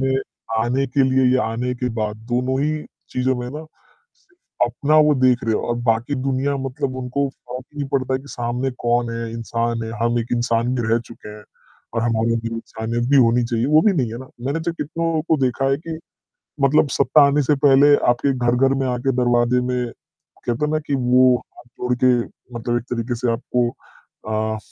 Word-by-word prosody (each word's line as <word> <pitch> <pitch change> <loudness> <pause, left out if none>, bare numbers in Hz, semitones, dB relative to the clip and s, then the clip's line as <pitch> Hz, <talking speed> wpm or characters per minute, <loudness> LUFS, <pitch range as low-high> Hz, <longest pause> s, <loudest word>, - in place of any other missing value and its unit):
में 135 0 +1 0.4
आने 125 +4 +1
के 135 +2 +1
लिए 130 0 +3
या 130 - +2
आने 120 +3 -2
के 125 0 -2
बाद 105 -1 -2
दोनों 130 +2 0
ही 155 0 -1 0.3
चीज़ों 130 +1 0
में 125 0 -4
ना 150 +3 -7 0.5
सिर्फ 375 - -4
अपना 145 +6 +1
वो 150 - +4
देख 130 -2 +2
रहे 110 -1 +1
हो - - 0
और 120 - +1
बाकी 115 +5 +1
दुनिया 135 +1 -1
मतलब 135 0 -3
उनको 130 +2 -1
फ़र्क 125 -1 -9
ही 150 - -12
नहीं 140 -1 -3
पड़ता 130 -1 -1
है 130 - -1
कि 140 - -15
सामने 120 +2 -2
कौन 120 0 +1
है? 115 0 -4
इंसान 115 0 -2
है 110 - -5
हम 120 0 +2
एक 115 - -2
इंसान 120 +1 +1
भी 120 - -1
रह 115 +1 +3
चुके 115 -2 -12
हैं। 105 0 -11 0.5
और 115 - 0
हमारा 115 0 +1
जो 115 0 -3
इंसानियत 115 +1 -3
भी 140 - +5
होनी 120 -1 +4
चाहिए। 115 +1 -1
वो 155 +2 +5
भी 210 - +4
नहीं 130 -10 0
है 120 - -6
ना। 130 - -10 0.2
मैंने 155 +4 -1
तो 170 +1 -2
कितनों 165 0 -2
को 160 - +4
देखा 130 +2 +1
है 135 - +2
कि, 160 +1 -7 0.6
मतलब 140 +2 +4
सत्ता 145 +2 +5
आने 145 +1 +2
से 145 +3 +2
पहले 145 +1 +7
आपके 135 +3 +2
घर 120 -1 +1
घर 135 - +2
में - - 0
आके 125 +2 0
दरवाजे 120 0 +2
में 125 0 -1 0.6
कहते 120 +5 0
है 150 - -2
ना 155 - +1
कि 140 - +1
वो 125 0 +4 0.2
हाथ - - -14
जोड़ 125 0 0
के 125 -1 +6 0.4
मतलब 120 +1 -1
एक 120 - -4
तरीके 120 +1 -2
से 120 0 0
आपको 120 0 0 0.6
अ, 110 0 -1
125 Hz, 210 wpm, -21 LUFS, 120-135 Hz, 0.6 s, पहले